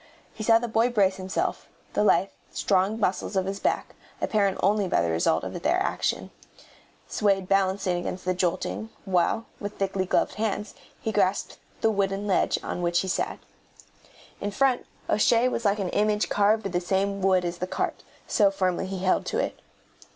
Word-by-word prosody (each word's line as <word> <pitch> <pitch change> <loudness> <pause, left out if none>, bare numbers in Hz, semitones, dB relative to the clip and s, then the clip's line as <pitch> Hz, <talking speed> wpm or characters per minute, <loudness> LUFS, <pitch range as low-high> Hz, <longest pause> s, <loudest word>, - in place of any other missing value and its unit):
He - - -9
saw 225 +1 +6
the 240 +1 -2
boy 225 +2 +2
brace 200 -5 +2
himself, 185 0 -3 0.2
the - - +2
lithe, 195 -1 +4 0.2
strong 195 +3 +1
muscles 195 0 -1
of 190 -1 +1
his 195 +1 -3
back, - - -1 0.3
apparent 200 -3 +1
only 200 +1 +3
by - - +2
the 85 -1 +1
result 80 +1 +1
of - - -5
their - - +2
action, - - -1 0.8
swayed 195 -3 +1
balancing 190 -1 +1
against 175 +1 -5
the 185 - +2
jolting, 110 - -2 0.2
while, 190 +4 +1
with 205 0 -6
thickly 195 -1 -1
gloved - - +1
hands, 210 -1 -2 0.3
he 220 - -2
grasped 200 -2 0 0.2
the 225 - +3
wooden 195 0 -1
ledge 195 -3 +2
on - - -4
which 175 0 +2
he 190 - -4
sat. 185 - -1 1.0
In 205 - -2
front 255 +4 +1 0.2
O'Shea 230 +3 +3
was 235 -2 -2
like 200 0 +3
an 195 -3 -2
image 210 +1 +1
carved 210 +1 +2
of 195 - -2
the 175 0 0
same 195 +2 0
wood 185 -1 +3
as 175 0 -3
the 180 - -2
cart, - - -2 0.2
so 205 -4 +4
firmly 185 -1 -1
he 190 -1 -5
held 185 - +2
to - - -1
it. - - -2
195 Hz, 180 wpm, -26 LUFS, 185-210 Hz, 1.0 s, saw